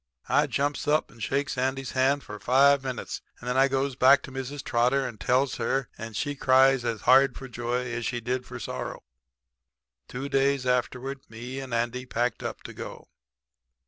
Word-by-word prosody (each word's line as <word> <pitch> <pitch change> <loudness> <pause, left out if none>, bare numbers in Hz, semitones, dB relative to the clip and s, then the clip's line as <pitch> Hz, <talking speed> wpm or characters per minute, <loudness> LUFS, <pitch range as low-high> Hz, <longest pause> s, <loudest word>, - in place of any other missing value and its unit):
"I - - +3
jumps 145 +1 -1
up 150 +1 +2
and 115 - -16
shakes 140 +3 -1
Andy's 130 0 -1
hand 135 +2 +2
for 105 0 -8
five 140 +3 +4
minutes, 130 -2 -4 0.2
and 120 - -10
then 125 - 0
I 135 +1 +5
goes 135 0 -1
back 135 +2 +6
to - - -9
Mrs. 135 +1 -5
Trotter 125 +3 +2
and 115 -4 -9
tells 130 +5 +1
her, 130 +3 -1
and 115 -1 -8
she 145 +6 -1
cries 135 -1 +4
as 115 -4 -2
hard 135 +1 +5
for 135 - -8
joy 120 +1 -2
as 120 0 -3
she 120 +1 -2
did 125 +2 -2
for - - -9
sorrow. - - -5 1.0
"Two 135 +3 -5
days 135 -1 +1
afterward 125 +2 -1
me 120 +4 -7
and 135 -1 -7
Andy 120 +2 -1
packed 120 0 -1
up - - -5
to - - -8
go. - - -9
130 Hz, 185 wpm, -27 LUFS, 125-135 Hz, 1.0 s, back